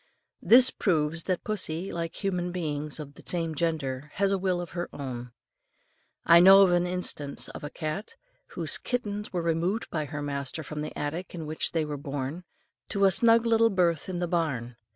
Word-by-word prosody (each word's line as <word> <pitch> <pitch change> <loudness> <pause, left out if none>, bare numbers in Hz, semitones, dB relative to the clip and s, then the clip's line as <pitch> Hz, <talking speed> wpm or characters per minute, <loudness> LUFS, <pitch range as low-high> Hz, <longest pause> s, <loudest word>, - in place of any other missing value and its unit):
This 255 +2 +7
proves 165 -3 0
that 185 -2 -1
pussy 190 -4 -2
like 165 -1 -4
human 180 -2 -1
beings 155 -4 -3
of 145 -2 -8
the - - -14
same 165 -2 -1
gender 150 -3 -2
has 195 0 +1
a 195 - +2
will 185 -1 0
of 175 -3 -6
her 175 +1 -4
own. 125 -3 -6 0.9
I 170 0 +8
know 195 +2 +9
an 175 -1 +2
instance 175 -6 -2
of - - -9
a 145 - -4
cat, 155 +8 -5 0.4
whose - - +1
kittens 210 -4 -3
were 175 -2 -2
removed 170 +6 0
by 155 -2 -2
her 145 0 -5
master 140 +2 -4
from 150 +1 -6
the 155 - -6
attic 160 +6 -4
in 165 -2 -6
which 155 +1 -2
they 160 -2 +1
were 150 -1 -4
born, 140 +4 -5 0.4
to 200 -1 +2
a 195 - +5
snug 230 +3 +5
little 230 0 +4
berth 175 -4 +1
in 185 - -3
the 175 0 -1
barn. 140 -9 -2
170 Hz, 190 wpm, -27 LUFS, 150-185 Hz, 0.9 s, know